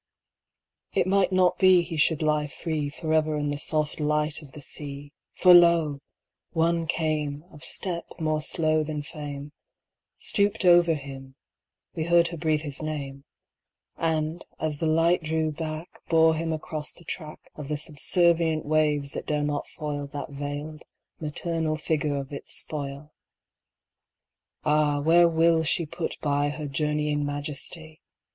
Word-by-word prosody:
It - - +2
might 195 0 +2
not 185 -1 +3
beHe 180 -4 +4
should 160 +1 +2
lie 150 -1 +1
freeForever 155 0 -1
in 145 0 -1
the 145 - -2
soft 155 0 0
light 150 +1 0
of 140 -4 -14
the 150 - -10
sea, 145 0 -7 0.2
For 180 -1 +7
lo! 170 -4 +5 0.5
one 165 0 +1
came, 150 -3 -1
Of 150 -4 -13
step 170 +6 -2
more 155 -1 0
slow 155 0 +1
than 150 -1 -4
fame, 145 -1 -7 0.7
Stooped 205 0 +1
over 175 -2 +6
him—we 135 - -10
heard 170 0 +4
her 170 - -6
breathe 155 -1 +1
his 145 -2 -3
name—And, 155 +2 -5 0.2
as 155 -2 -2
the 165 - 0
light 165 +3 +3
drew 160 0 0
back, 155 +2 -6
Bore 160 -1 +5
him 165 +1 -2
across 155 -1 -3
the 170 - -13
trackOf 155 -3 -8
the 150 0 -2
subservient 160 +1 +1
waves 150 -2 +1
that - - -6
dare 150 -1 0
not 145 0 -2
foilThat 145 -2 -4
veiled, 145 +2 -5 0.4
maternal 160 0 -2
figure 150 -2 -1
of 140 0 -5
its 140 - -7
spoil. 145 0 -5 1.5
Ah! 150 -1 +3
where 170 +3 +5
will 165 0 +3
she 165 +2 +1
put 170 +2 -4
byHer 145 +1 0
journeying 150 0 0
majesty? 150 +2 -5
155 Hz, 135 wpm, -26 LUFS, 145-165 Hz, 1.5 s, For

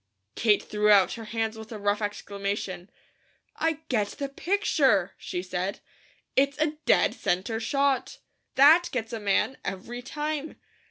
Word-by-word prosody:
Kate 215 -3 +3
threw 210 0 +1
out 195 -3 +6
her 225 -1 -7
hands 225 0 -2
with 220 +1 -10
a 220 - -5
rough 205 +1 0
exclamation. 200 -2 -4 0.7
"I 320 -1 0
get 215 -5 +1
the 280 +3 -5
picture!" 275 - +1
she 180 - -5
said. 185 +1 -3 0.6
"It's 280 +1 +2
a 305 0 0
dead - - +4
centre 190 +6 -1
shot. 275 +2 0 0.4
THAT 310 +6 +7
gets 235 -2 -3
a 225 - -3
man, 205 +5 +1
every 235 +6 -5
time. 300 +3 -4
225 Hz, 145 wpm, -27 LUFS, 205-280 Hz, 0.7 s, THAT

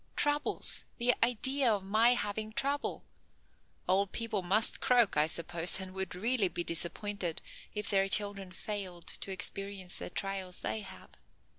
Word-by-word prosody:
Troubles! 290 0 +2
The 245 +1 +4
idea 255 +2 +3
of 205 -3 -1
my 220 +5 +4
having 215 0 -3
trouble! 280 +4 -1 0.8
Old 190 +1 +2
people 230 -4 -2
must 200 +5 +2
croak, 245 -5 +3
I 150 +1 +4
suppose, 170 +2 +2
and 190 -1 -6
would 190 -2 -3
really 220 +2 +1
be 175 -1 -4
disappointed 175 +1 -3 0.4
if 210 0 -2
their 195 -1 +2
children 200 -2 -1
failed 185 -3 -5
to 195 - -5
experience 195 -1 -5
the - - -6
trials 190 -1 -3
they - - -1
have. 205 - -11
200 Hz, 145 wpm, -32 LUFS, 185-220 Hz, 0.8 s, The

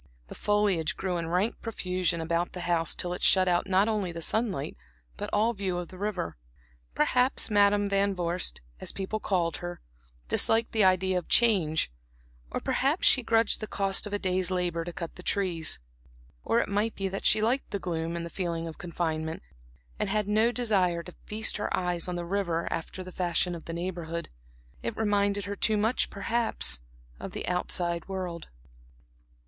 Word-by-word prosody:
The - - -7
foliage 205 -6 +1
grew 185 -2 -1
in 165 -1 -3
rank 180 +7 0
profusion 185 -6 -1
about 170 +2 -1
the 180 - -5
house 170 -2 +2
till 175 0 -1
it 180 - -6
shut 185 -1 +5
out 175 +2 +2
not 190 +3 +4
only 210 -5 0
the 165 - -6
sunlight, 215 - -1 0.4
but - - -5
all 220 +3 +2
view 190 -4 -2
of 175 -1 -4
the 185 - -11
river. 200 - -2 0.6
Perhaps 250 - +3
Madam 205 0 +4
Van 200 0 +2
Vorst, 175 0 -2 0.2
as - - -5
people 195 +3 -3
called 175 -5 0
her, 175 0 -6 0.5
disliked 225 - +3
the 220 -2 +3
idea 185 0 +3
of 175 - -12
change; 180 - +3 0.6
or - - -2
perhaps 280 +7 +1
she 260 - +6
grudged 225 -1 +2
the 215 - -5
cost 195 0 0
of - - -7
a - - +2
day's 185 -2 0
labor 175 -2 -1
to 175 - -5
cut 170 -1 -6
the - - -8
trees; 180 -4 0 0.7
or - - +2
it - - 0
might 205 +3 0
be 195 - -2
that 195 +1 -4
she - - +5
liked 240 +5 +1
the 200 - -2
gloom 170 -3 -3
and 170 0 -3
the 170 - -8
feeling 170 -3 -2
of 160 - -8
confinement, 160 -2 -3 0.6
and - - 0
had 210 0 0
no 215 +3 +3
desire 190 -8 +1
to 180 - -11
feast 220 +1 +1
her 205 - -2
eyes 180 -2 0
on 180 - -2
the 175 0 -3
river, 170 -3 -1
after 165 +3 -5
the 185 - -9
fashion 175 0 0
of 170 - -8
the - - -5
Neighborhood. 170 -1 -4 0.5
It - - -4
reminded 205 -2 +1
her 200 0 -3
too 215 +2 +2
much, 220 +4 +1
perhaps, 200 - -1 0.4
of - - -7
the - - -5
outside 175 -1 0
world. 185 -4 -4
185 Hz, 185 wpm, -28 LUFS, 170-205 Hz, 0.7 s, she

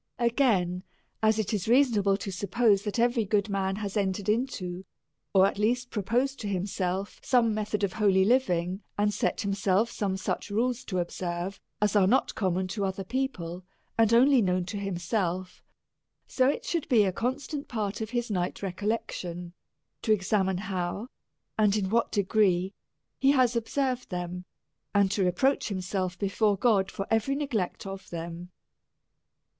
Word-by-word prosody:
Again: 230 -8 +2 0.4
As 220 0 +3
it 220 0 -1
is 205 -2 -1
reasonable 225 -6 +4
to 195 - -5
suppose, 200 +2 +2
that 210 - -2
every 240 0 +2
good 205 +1 0
man 195 -1 0
has 200 -1 -4
entered 200 0 -1
into, 195 -6 -1 0.5
or 190 -1 +6
at 200 +1 -1
least 245 +3 0
proposed 245 +6 0
to 210 - -4
himself^ 190 0 -2
some 240 -4 +3
method 210 -1 -2
of 190 -2 0
holy 195 -3 +3
living, 190 -6 +1 0.2
and 205 0 +2
set - - 0
himself 200 +2 +1
some 195 -2 -2
such 190 - -3
rules 235 +4 0
to 185 - -3
observe, 175 +1 -3 0.2
as 210 0 +1
are 195 -2 +5
not 255 +7 +2
common 185 -2 0
to 200 +1 -2
other 195 0 -2
people, 185 -7 -3 0.3
and 225 -1 +3
only 255 +2 +6
known 180 -2 +1
to 205 +3 -5
himself; 185 -1 -2 0.6
so 260 0 +2
it 290 - -2
should 335 -4 -2
be 230 -6 +5
a 190 - +1
constant 275 - -3
part 210 -4 -3
of 220 - -3
his 240 -1 -2
night 180 0 -2
recollection, 185 -3 -3 0.5
to 220 - 0
examine 190 -2 +2
how 195 +3 -3 0.5
and 210 -1 +4
in 190 -2 -1
what 230 +1 +2
degree 195 -2 +2 0.5
he 275 +1 +5
has 250 -3 +3
observed 255 +2 -1
them, 180 -1 -4 0.5
and 200 -1 +4
to 200 - +1
reproach 185 +10 +2
himself 185 -2 -2
before 205 +1 +1
God 200 -3 +3
for 195 - -4
every 225 +5 +2
neglect 250 -13 -2
of 195 0 -7
them. 170 +1 -6
200 Hz, 160 wpm, -28 LUFS, 185-230 Hz, 0.6 s, or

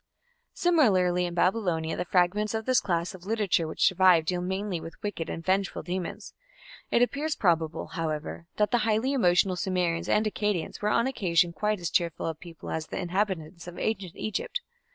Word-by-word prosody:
Similarly 185 - +3
in 175 - -6
Babylonia 175 -4 +1
the 180 - -3
fragments 195 +5 +1
of 220 0 -3
this 255 -1 +3
class 175 0 -1
of 185 -2 -12
literature 205 -7 +1
which 155 - 0
survive 185 -3 +5
deal 180 +2 -1
mainly 190 -1 -2
with 165 - -9
wicked 190 -6 -3
and 165 - -5
vengeful 195 +1 0
demons. 185 +4 -5 0.6
It 235 - +4
appears 295 +5 -1
probable, 165 -4 +1
however, 160 +1 -4
that 210 0 +1
the 240 - +3
highly 220 +4 +1
emotional 185 -6 +3
Sumerians 175 -2 -1
and 215 - +3
Akkadians 210 -5 -2
were 210 - +1
on 230 +2 +2
occasion 175 -9 +1
quite 210 +2 -1
as 170 -2 -3
cheerful 170 -3 0
a 165 - -1
people 165 +1 -10
as 160 -1 -3
the - - -5
inhabitants 180 -2 -2
of 175 - -8
ancient 195 -5 -2
Egypt. 350 - -3
185 Hz, 175 wpm, -28 LUFS, 170-210 Hz, 0.6 s, survive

